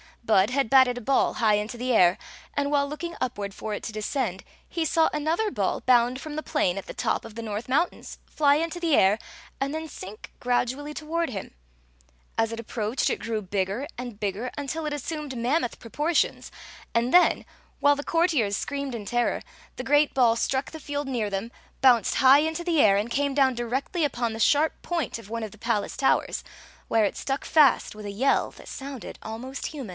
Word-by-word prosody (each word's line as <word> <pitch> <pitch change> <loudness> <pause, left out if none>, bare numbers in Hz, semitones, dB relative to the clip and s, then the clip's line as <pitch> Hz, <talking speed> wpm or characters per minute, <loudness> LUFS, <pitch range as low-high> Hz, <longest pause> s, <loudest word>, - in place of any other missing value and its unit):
Bud 215 -2 +4
had 270 -3 +1
batted 260 -2 +5
a - - -5
ball 270 +4 +2
high 215 -2 +3
into 210 +3 -3
the 250 +1 -1
air, 180 -4 +5 0.4
and 285 0 0
while 280 -1 +2
looking 335 +4 -5
up 250 -3 -2
ward 200 -1 -4
for 215 +1 -5
it - - -5
to - - -4
descend 215 -2 -2 0.2
he 335 -1 -2
saw 320 +1 +3
another 320 +8 0
ball - - -1
bound 250 +1 +3
from 305 -1 -6
the 310 - -3
plain 200 - 0
at 195 - -5
the - - -8
top - - -1
of 225 -2 -11
the 230 - -5
North 215 0 -4
Mountains, 300 +7 -1
fly 285 -2 +3
into 330 +3 -2
the 330 -4 +2
air, 195 +3 +4 0.4
and 275 +2 -1
then 320 0 -4
sink 200 -3 -9
gradually 255 +4 -1
toward 325 +2 -2
him. 195 -6 -6 0.8
As 225 0 +1
it 230 - -5
approached, 225 +1 -1
it - - -1
grew 225 -2 -2
bigger 195 +5 -2
and 240 -4 -7
bigger, 210 +4 -2
until 295 +3 -3
it 300 - -2
assumed 295 -2 -4
mammoth 245 +2 0
proportions; 300 +8 0 0.5
and 235 +2 +1
then, 360 0 +5 0.4
while 285 0 +5
the 285 - -4
courtiers 310 - +2
screamed 280 -3 -3
in 215 -3 -6
terror, 240 +3 0 0.3
the 255 - -5
great 290 +1 +3
ball 240 -3 +4
struck 265 +4 -1
the 320 - -8
field 290 -1 -4
near 235 -6 -1
them, 200 +4 -3 0.3
bounced 245 -5 +5
high 265 +2 +7
into 320 +2 -1
the 340 -3 +1
air, 200 -6 +6
and 210 +4 -1
came 280 +2 0
down 270 -2 +4
directly 260 +8 -1
upon 240 -4 -1
the 225 - -6
sharp 295 +7 +3
point 335 -9 -2
of 215 -3 -13
one 230 0 -3
of 215 - -5
the 215 - -16
pal 230 -3 0
ace - - -8
towers» 270 - +1 0.4
where 225 -2 +3
it - - -2
stuck 270 +1 -2
fast 295 -5 +4
with 210 -1 -9
a 205 - -4
yell 250 +8 +2
that - - -15
soun^ 270 -3 -7
almost 250 +5 -5
human. 275 -8 -7
255 Hz, 205 wpm, -26 LUFS, 225-290 Hz, 0.8 s, high